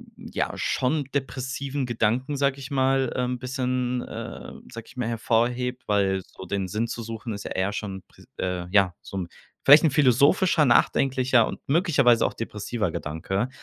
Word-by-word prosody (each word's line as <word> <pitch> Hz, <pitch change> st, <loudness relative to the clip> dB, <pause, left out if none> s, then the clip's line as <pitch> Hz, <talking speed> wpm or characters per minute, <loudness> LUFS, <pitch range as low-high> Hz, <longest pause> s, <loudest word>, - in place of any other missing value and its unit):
ja, -, -, -3 dB
schon 145 Hz, +3 st, 0 dB
depressiven 135 Hz, 0 st, -3 dB
Gedanken, 120 Hz, +4 st, 0 dB
sage 140 Hz, 0 st, +1 dB
ich 135 Hz, +1 st, -8 dB
mal, 135 Hz, -1 st, +2 dB
ähm, 125 Hz, -1 st, -1 dB
bisschen, 125 Hz, -1 st, -1 dB
äh, -, -, -7 dB, 0.2 s
sage 115 Hz, -1 st, -8 dB
ich 120 Hz, -, -16 dB
mal, 125 Hz, -2 st, -1 dB
hervorhebt. 120 Hz, +2 st, 0 dB
Weil 95 Hz, -2 st, +1 dB
so 95 Hz, -, -12 dB
den 95 Hz, 0 st, -2 dB
Sinn 110 Hz, +5 st, -2 dB
zu 115 Hz, 0 st, -5 dB
suchen 115 Hz, 0 st, -6 dB
ist 100 Hz, -, -6 dB
ja -, -, -7 dB
eher 95 Hz, +2 st, -1 dB
schon 95 Hz, -3 st, -5 dB
pr -, -, -19 dB
äh, 90 Hz, -1 st, -3 dB
ja, 95 Hz, -3 st, +4 dB
so 95 Hz, -, -8 dB
'n 90 Hz, -2 st, -3 dB, 0.4 s
vielleicht 145 Hz, +3 st, +9 dB
'n 155 Hz, -, +4 dB
philosophischer, 150 Hz, -, +4 dB
nachdenklicher 130 Hz, 0 st, +3 dB
und -, -, -6 dB
möglicherweise 140 Hz, -, +3 dB
auch -, -, -1 dB
depressiver 105 Hz, -3 st, -3 dB
Gedanke. 95 Hz, +12 st, -3 dB
125 Hz, 165 wpm, -25 LUFS, 105-135 Hz, 0.4 s, vielleicht